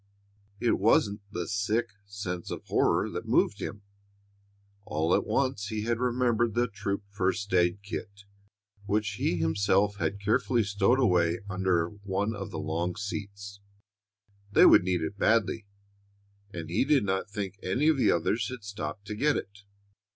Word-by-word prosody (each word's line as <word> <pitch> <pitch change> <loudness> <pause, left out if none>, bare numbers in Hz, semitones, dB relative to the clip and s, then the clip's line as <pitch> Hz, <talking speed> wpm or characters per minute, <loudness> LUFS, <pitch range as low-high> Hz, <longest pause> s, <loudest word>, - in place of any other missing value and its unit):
It 120 - +1
wasn't 105 0 +3
the 85 -3 -4
sick 105 +4 0 0.2
sense 95 -3 -5
of - - -6
horror - - +2
that - - -5
moved - - +2
him. 105 - -6 1.0
All 80 0 0
at - - +1
once 130 -7 0
he 110 -1 -3
had 115 +1 -1
remembered 120 -2 +1
the 120 +1 +2
troop 100 -2 -4
first 95 0 -1
aid 90 +2 +2
kit, 100 -1 -7 0.6
which 105 +1 +1
he 90 - +1
himself 100 +5 +2
had 100 0 -2
carefully 110 +3 +1
stowed 100 +5 +2
away 90 -7 +2
under 95 -4 +1
one 100 +2 -3
of 100 -1 -6
the - - -6
long 85 +3 -2
seats. 100 -1 -6 0.9
They - - +7
would - - +8
need 90 -1 0
it 100 +6 -5
badly, 110 -1 +2 0.8
and 85 -3 -7
he 95 - +2
did 140 -2 +3
not 95 0 -1
think 100 -1 -5
any 125 +11 0
of 160 -2 +4
the 130 - +4
others 105 +9 0
had 125 -4 -8
stopped 100 -2 -6
to 105 - -5
get 145 +6 +2
it. 100 0 -7
100 Hz, 160 wpm, -28 LUFS, 95-110 Hz, 1.0 s, would